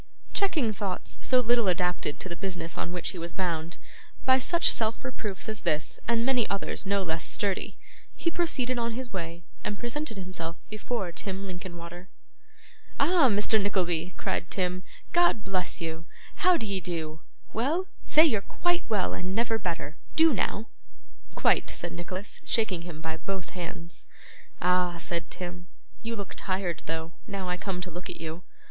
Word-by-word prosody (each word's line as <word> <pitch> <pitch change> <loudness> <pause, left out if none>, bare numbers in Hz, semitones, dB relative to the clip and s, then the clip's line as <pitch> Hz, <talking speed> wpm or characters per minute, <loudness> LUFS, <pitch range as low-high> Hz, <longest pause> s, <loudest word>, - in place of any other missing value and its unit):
Checking 310 - +3
thoughts 195 -3 -2
so 255 -1 +5
little 240 -2 +4
adapted 180 -4 +1
to - - -2
the 170 - -4
business 175 -3 -3
on 175 - -2
which 180 -1 0
he 185 - -6
was 170 0 -4
bound, 170 -3 -1 0.5
by 260 0 +7
such 340 +6 +4
self 225 +3 +1
reproofs 215 -6 -3
as 215 -1 -1
this 150 0 0
and 230 0 +3
many 250 -3 +3
others 200 0 -2
no 200 0 +3
less 160 -2 -1
sturdy, 200 -2 0 0.4
he 335 - +1
proceeded 255 -8 +1
on 230 -1 0
his 245 -1 -5
way 170 -2 -4 0.2
and 205 - -1
presented 240 -1 -3
himself 175 -3 -4 0.2
before 215 -3 -2
Tim 195 +2 -3
Linkinwater. 175 -1 -7 0.9
'Ah! 335 -7 +6
Mr. 210 +1 +4
Nickleby!' 180 -3 +1
cried 170 - -1
Tim, 180 -1 0 0.3
'God 345 -11 +5
bless 185 -1 0
you! 165 0 -3 0.3
how 365 0 +6
d'ye 200 -6 -1
do? 160 -3 -3 0.3
Well? 295 - +2 0.2
Say 310 +2 +7
you're 225 -10 +3
quite 350 - +1
well 205 -4 +2
and 185 +1 -2
never 225 0 +2
better. 165 -4 -3 0.2
Do 320 -1 +7
now.' 215 0 0 0.7
'Quite,' - - +4
said - - -3
Nicholas, 185 +3 -5
shaking 200 -7 +1
him 170 -2 -7
by 160 0 -3
both 190 +2 -3
hands. 170 -1 -5 0.6
'Ah!' 180 -1 +4
said 170 0 -2
Tim, 175 -1 -6 0.3
'you 230 +1 -2
look 200 -3 -5
tired 185 -3 -1
though, 160 +1 -2 0.2
now 195 -2 -3
I 180 - +1
come 180 -1 -3
to 180 0 -4
look 175 +3 -6
at - - -6
you. 165 +1 -4
190 Hz, 165 wpm, -29 LUFS, 175-230 Hz, 0.9 s, by